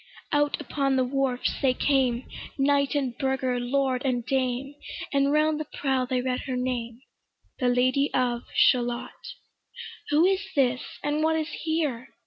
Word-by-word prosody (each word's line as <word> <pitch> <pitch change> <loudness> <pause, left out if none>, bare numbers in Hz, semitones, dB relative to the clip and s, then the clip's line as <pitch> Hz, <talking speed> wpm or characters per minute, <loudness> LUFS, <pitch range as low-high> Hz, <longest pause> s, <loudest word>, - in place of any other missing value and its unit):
Out 290 0 +1
upon 275 -1 0
the 260 - +3
wharfs 260 -1 -1
they 260 -2 +3
came, 260 -4 +1 0.3
Knight 280 +1 +2
and 265 -4 -1
burgher, 265 -2 0
lord 260 +1 0
and 245 -3 0
dame, 260 +1 -1 0.4
And 280 0 +3
round 305 +1 +2
the 310 - -4
prow 265 -2 0
they 255 -1 0
read 255 0 -2
her 260 - -2
name, 245 -2 -3 0.6
'The 250 - +1
Lady 255 +3 +2
of 245 -2 0
Shalott' 240 -1 +1 0.7
Who 300 +3 +4
is 385 +1 +2
this? 255 -2 +2 0.2
and 295 +1 0
what 320 0 +3
is 315 0 -1
here? 305 -8 -2
265 Hz, 150 wpm, -26 LUFS, 250-285 Hz, 0.7 s, Who